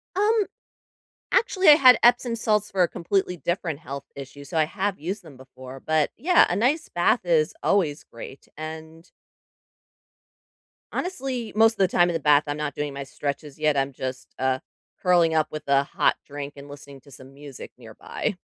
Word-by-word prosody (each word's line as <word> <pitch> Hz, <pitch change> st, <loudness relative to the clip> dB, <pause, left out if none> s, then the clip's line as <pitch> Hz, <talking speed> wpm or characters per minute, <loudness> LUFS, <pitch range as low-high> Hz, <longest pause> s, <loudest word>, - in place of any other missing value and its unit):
Um, 420 Hz, +1 st, +2 dB, 0.9 s
actually, 405 Hz, -7 st, +2 dB
I -, -, +12 dB
had 255 Hz, -5 st, +7 dB
Epsom 240 Hz, 0 st, +3 dB
salts 210 Hz, -2 st, 0 dB
for 190 Hz, -2 st, +1 dB
a 170 Hz, -, +3 dB
completely 180 Hz, +1 st, -1 dB
different 170 Hz, -3 st, -3 dB
health 140 Hz, -4 st, -7 dB
issue, 140 Hz, +1 st, -10 dB
so 160 Hz, +3 st, -3 dB
I 155 Hz, -, +4 dB
have 195 Hz, +5 st, -3 dB
used 190 Hz, +6 st, -5 dB
them 150 Hz, -5 st, -14 dB
before. 130 Hz, 0 st, -12 dB
But, 155 Hz, -1 st, +1 dB
yeah, 360 Hz, +2 st, +4 dB
a 175 Hz, -, -1 dB
nice 280 Hz, +9 st, +1 dB
bath -, -, +1 dB
is 480 Hz, -7 st, +1 dB
always 165 Hz, -7 st, 0 dB
great 115 Hz, +3 st, -12 dB
and 160 Hz, +1 st, -9 dB, 1.8 s
honestly, 265 Hz, -10 st, -4 dB
most 225 Hz, +1 st, +4 dB
the 190 Hz, -2 st, +3 dB
time 175 Hz, -1 st, +3 dB
in -, -, -1 dB
the 165 Hz, -, -1 dB
bath, 145 Hz, 0 st, +4 dB
I'm 145 Hz, +1 st, -3 dB
not 150 Hz, -1 st, -4 dB
doing 145 Hz, -1 st, -3 dB
my 140 Hz, -, -5 dB
stretches 140 Hz, +2 st, -6 dB
yet, 150 Hz, -2 st, +1 dB
I'm 135 Hz, 0 st, 0 dB
just, 130 Hz, 0 st, -7 dB
uh, 130 Hz, 0 st, 0 dB, 0.4 s
curling 175 Hz, -3 st, +3 dB
up 155 Hz, -1 st, +2 dB
with 155 Hz, -1 st, -7 dB
a 140 Hz, 0 st, +3 dB
hot -, -, +1 dB
drink 145 Hz, 0 st, -7 dB
and 140 Hz, 0 st, -12 dB
listening 140 Hz, -1 st, -12 dB
to 140 Hz, -, -19 dB
some 130 Hz, +1 st, -14 dB
music 140 Hz, -2 st, -11 dB
nearby. 115 Hz, -, -5 dB
155 Hz, 180 wpm, -24 LUFS, 140-205 Hz, 1.8 s, I